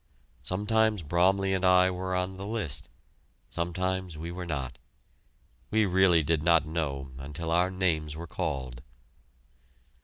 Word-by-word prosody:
Sometimes 105 0 +1
Bromley 95 +5 +2
and 95 -1 -1
I 90 0 +5
were 95 0 -3
on 90 +1 -2
the 95 +1 -6
list, 105 - -4 0.6
sometimes 90 0 -2
we 85 +2 -5
were 90 0 -6
not. 70 -6 -4 0.9
We 110 - +2 0.4
did 80 +1 +1
not 85 -1 +4
really 80 +1 -8
know 70 -5 -2
until 75 +4 -5
our 90 +2 +3
names 80 -5 -1
were 85 +2 -6
called. 65 -6 -4
85 Hz, 130 wpm, -28 LUFS, 80-95 Hz, 0.9 s, I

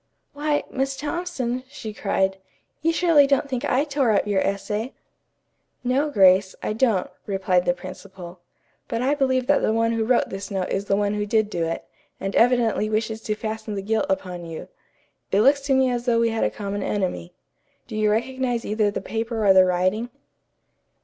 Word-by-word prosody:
"Why, 295 0 0
Miss 270 +1 -2
Thompson," 290 -6 -3
she 220 -5 -7
cried, 195 -2 0 0.4
"you 330 - +2
surely 330 -4 +4
don't 275 +1 +2
think 260 -1 -3
I 280 -1 +2
tore 280 -4 0
up 205 - +2
your 200 -2 +1
essay?" 210 +5 -2 0.9
"No, 265 +4 +1
Grace, 190 -5 +4
I - - -1
don't," 220 -5 +1 0.2
replied 185 -2 +1
the 175 - +2
principal. 185 -1 -10 0.5
"But 230 +1 -2
I 275 +3 +2
believe 260 -3 +1
that 285 +2 +3
the - - +2
one 230 +1 +1
who 230 -1 0
wrote 235 +2 +2
this 195 +2 -6
note 190 -3 -2
is 195 +1 -1
the 195 - +1
one 205 0 0
who 210 0 -2
did 215 0 +1
do 170 -3 -1
it, 165 0 -4 0.3
and 195 +1 -4
evidently 230 -3 +3
wishes 220 +1 -1
to 215 - -2
fasten 220 -1 -5
the 195 - -4
guilt 220 +2 0
upon 180 -2 -2
you. 165 -1 -8 0.6
It 200 - +4
looks 280 +4 +4
to 270 - +3
me 260 -1 +3
as 240 0 -2
though 230 -1 +3
we 230 0 +3
had 225 0 -1
a - - +2
common 205 -1 -4
enemy. 180 - -3 0.5
Do - - -7
you 215 0 +2
recognize 245 +2 -1
either 210 0 +1
the 200 - -4
paper 225 +1 -3
or 195 - +7
the 185 -1 +7
writing?" 185 +6 0
220 Hz, 190 wpm, -23 LUFS, 195-255 Hz, 0.9 s, or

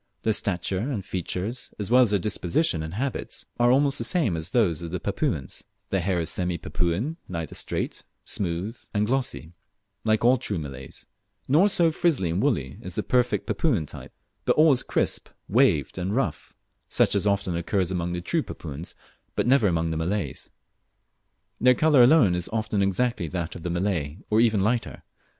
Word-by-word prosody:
Their 110 - +2
stature 95 -2 -1
and 120 +8 -2
their 100 - -3
features, 95 +6 -4
as 105 +1 -4
well 125 +1 +7
as 120 - +4
their 105 - +3
disposition 90 - 0
and 80 +3 -6
habits, 135 +4 -4
are 120 0 +5
almost 140 +1 +3
the - - -1
same 120 - +1
as 80 +1 -3
those 95 -9 +2
of 85 - -5
the 90 +2 -3
Papuans; 65 -4 -2 0.3
their 95 - +1
hair 90 0 0
is 85 0 -1
semi 90 -2 -1
Papuan 90 - -2
neither 85 -4 -4
straight, - - -2 0.2
smooth, 95 +4 -2 0.2
and 105 +1 +2
glossy, 125 -9 -2 0.5
like 110 +1 +2
all 125 +2 +6
true 100 - -2
Malays', 70 -4 -7 0.4
nor 165 +10 +5
so 170 -4 +3
frizzly 155 - +1
and 90 - 0
woolly 80 - -1
as 90 -1 -7
the - - -1
perfect 125 -1 +1
Papuan 115 - 0
type, - - -10 0.3
but - - +3
always 150 -5 +5
crisp, - - -1 0.2
waved, 95 - +2
and 95 +4 -2
rough, 125 - -2 0.3
such - - +3
as 100 0 +1
often 100 -3 0
occurs 90 +2 0
among 90 -1 -2
the 90 - -3
true 165 - 0
Papuans, 80 - -7 0.4
but - - +1
never 125 -3 +4
among 85 -2 0
the 80 - -2
Malays. 95 +6 -3 1.1
Their 125 +1 +5
colour 150 -1 +5
alone 120 - +6
is 90 -1 -1
often 110 -2 -1
exactly 100 0 0
that 85 0 -4
of 90 - -9
the 90 - -3
Malay, 85 -4 -1
or 110 +1 +5
even 110 -4 +3
lighter. 115 +4 -1
100 Hz, 180 wpm, -25 LUFS, 85-125 Hz, 1.1 s, well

